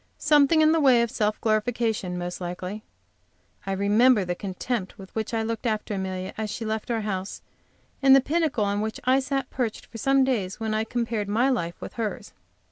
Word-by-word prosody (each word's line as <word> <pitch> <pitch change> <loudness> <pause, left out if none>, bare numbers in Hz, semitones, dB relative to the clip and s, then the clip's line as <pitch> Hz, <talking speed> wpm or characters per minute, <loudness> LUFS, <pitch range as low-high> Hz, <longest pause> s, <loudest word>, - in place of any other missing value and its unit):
Something 300 +1 +4
in 310 - +5
the 325 - +3
way 255 -5 +5
of 235 - -3
self 210 0 0
glorification, 220 -4 0
most 180 +1 -5
likely. 180 +4 -5 0.9
I - - -1
remember 205 +3 +4
the 175 - -1
contempt 195 +2 -4
with 190 -1 -12
which 220 -1 -3
I 225 -1 0
looked 230 +2 -3
after 215 -1 -2
Amelia 190 -1 -4
as 215 -1 -2
she 225 - -5
left 220 +1 -3
our 230 -2 0
house, 195 -2 -4 0.6
and 270 -1 +7
the - - +7
pinnacle 300 -6 0
on 200 +1 0
which 220 0 -3
I 255 +2 +4
sat 270 -1 -2
perched 240 -4 -3
for 225 - -10
some 270 +3 +3
days, 215 -8 -1
when 220 -1 -2
I 215 +1 0
compared 230 -3 -2
my 235 +6 +2
life 170 -9 -2
with - - -8
hers. 215 0 -4
220 Hz, 200 wpm, -25 LUFS, 200-250 Hz, 0.9 s, and